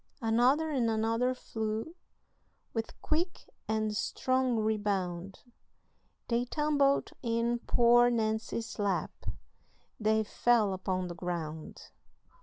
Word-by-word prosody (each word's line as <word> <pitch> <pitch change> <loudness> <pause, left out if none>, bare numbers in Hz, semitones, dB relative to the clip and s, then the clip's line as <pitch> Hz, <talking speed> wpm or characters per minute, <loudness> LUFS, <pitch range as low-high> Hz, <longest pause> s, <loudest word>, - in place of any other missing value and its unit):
Another 255 +7 +3
and 250 -5 +1
another 225 +3 +1
flew, 220 +5 -4 0.8
With 225 -1 -4
quick 345 +4 -1 0.2
and 215 -1 0
strong 255 +2 +1
rebound, 195 -4 -1 0.9
They 235 +1 +1
tumbled 285 0 +2
in 235 0 0
poor 240 0 +5
Nancy's 225 0 -2
lap, 200 -2 0 0.9
They 220 0 +2
fell 220 -2 +2
upon 185 -1 -2
the 175 - -5
ground. 165 -3 -5
225 Hz, 95 wpm, -31 LUFS, 210-245 Hz, 0.9 s, poor